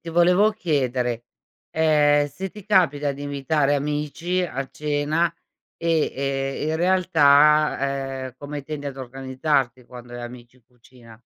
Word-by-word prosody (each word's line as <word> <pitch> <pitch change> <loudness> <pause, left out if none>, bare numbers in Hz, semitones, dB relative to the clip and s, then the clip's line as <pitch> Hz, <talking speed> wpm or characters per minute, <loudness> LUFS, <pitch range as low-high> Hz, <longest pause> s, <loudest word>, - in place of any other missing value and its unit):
ti 165 - -8
volevo 180 +5 +4
chiedere, 125 - -1 0.5
ehm, 150 -2 +3
se 190 +7 -6
ti 210 -3 -13
capita 150 -8 +2
di 140 +1 -9
invitare 145 +1 0
amici 150 +5 -2
a 135 -6 -3
cena 150 +3 0 0.4
e 165 -2 +1
e 135 +1 -2
in 160 - 0
realtà, 145 -6 +3
ehm, 125 - -10
come 145 0 -6
tendi 145 +1 -6
ad 135 -1 -6
organizzarti 130 0 -2
quando 120 0 -12
hai 120 - -6
amici 120 0 -10
in 130 - -27
cucina? 120 -1 -18
145 Hz, 135 wpm, -23 LUFS, 130-160 Hz, 0.5 s, volevo